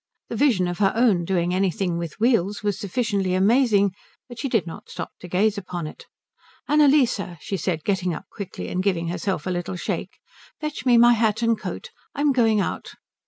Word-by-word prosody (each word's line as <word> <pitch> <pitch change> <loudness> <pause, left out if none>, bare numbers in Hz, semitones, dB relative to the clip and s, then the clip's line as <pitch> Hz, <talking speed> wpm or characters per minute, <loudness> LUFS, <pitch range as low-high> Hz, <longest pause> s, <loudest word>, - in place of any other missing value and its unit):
The - - -4
vision 225 -11 +3
of 175 0 -4
her 195 -2 +3
own 220 -8 +3
doing 175 -1 0
anything 185 -2 0
with 170 +2 -6
wheels 210 -4 +1
was 205 -2 -1
sufficiently 200 -3 -1
amazing, 200 -1 +3 0.3
but 240 -2 -10
she 275 - -2
did 225 -8 +1
not 165 - -9
stop - - -6
to 180 - -9
gaze 200 +4 +1
upon 175 -3 -5
it. 155 - -10 0.6
"Annalise," 290 -6 +4 0.2
she 195 - -4
said, 165 -3 -2
getting 190 -3 0
up 160 - -6
quickly 200 -3 -6
and 180 - -1
giving 175 -4 0
herself 180 -1 -2
a 185 - -1
little 175 +1 -3
shake, 180 - -4 0.4
"fetch 300 -4 -4
me 240 -1 +6
my 240 +1 +7
hat 220 0 +1
and 230 0 +3
coat. 480 - -7 0.2
I'm 290 0 +2
going 225 -5 +3
out." 195 - -3
200 Hz, 190 wpm, -23 LUFS, 180-235 Hz, 0.6 s, my